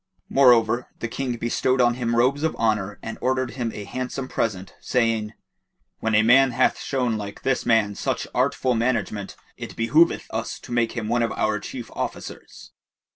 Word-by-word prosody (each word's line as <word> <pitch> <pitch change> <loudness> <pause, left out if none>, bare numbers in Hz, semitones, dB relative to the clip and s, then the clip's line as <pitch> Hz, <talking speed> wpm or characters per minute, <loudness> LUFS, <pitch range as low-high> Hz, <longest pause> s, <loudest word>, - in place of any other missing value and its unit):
Moreover 120 -3 +4
the 115 - -3
King 125 +1 -3
bestowed 125 +3 0
on 120 -1 +4
him 120 -1 -1
robes 130 +4 +2
of 160 0 0
honour 105 -3 0
and 115 - -6
ordered 130 -1 0
him 120 -3 -3
a 105 - -7
handsome 130 +4 -4
present, 95 -7 -3
saying, 115 -3 0 0.7
"When 110 -1 0
a 110 - +5
man 130 +3 +5
hath 125 +2 +2
shown 125 -5 -1
like 100 -1 -8
this 135 -1 0
man 110 -3 +3
such - - -2
artful 130 -1 +1
management, 110 -4 -1 0.2
it - - -8
behoveth 150 +9 +3
us - - -3
to - - -12
make 120 -1 +1
him 115 -3 -4
one 120 +2 +1
of 115 - 0
our 110 -1 0
chief 120 +4 -8
officers." - - -7
120 Hz, 175 wpm, -24 LUFS, 110-130 Hz, 0.7 s, a